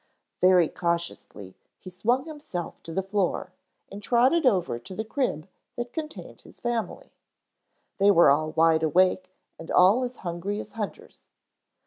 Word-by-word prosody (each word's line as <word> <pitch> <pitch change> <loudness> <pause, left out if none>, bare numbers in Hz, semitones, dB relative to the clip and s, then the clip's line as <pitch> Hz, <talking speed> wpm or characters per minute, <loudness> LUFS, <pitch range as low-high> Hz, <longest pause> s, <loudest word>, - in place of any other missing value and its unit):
Very 180 -2 +5
cautiously 170 - -4 0.2
he 185 - -11
swung 235 - 0
himself 290 - -7
to 165 - -8
the 190 +4 -2
floor 190 -1 -1 0.4
and 200 +1 -8
trotted 255 +8 +3
over 180 - +1
to 185 +10 -10
the 220 - -4
crib 220 - -2 0.3
that 240 0 -5
contained 310 -2 -7
his - - -17
family. 240 - -4 0.9
They 200 +1 +5
were 170 -7 +6
all 155 +2 +1
wide 160 0 +3
awake 185 +3 +2 0.3
and 165 - -10
all 200 +8 +5
as 250 0 -4
hungry 175 +4 -3
as - - -8
hunters. 215 -3 -8
190 Hz, 145 wpm, -26 LUFS, 170-240 Hz, 0.9 s, were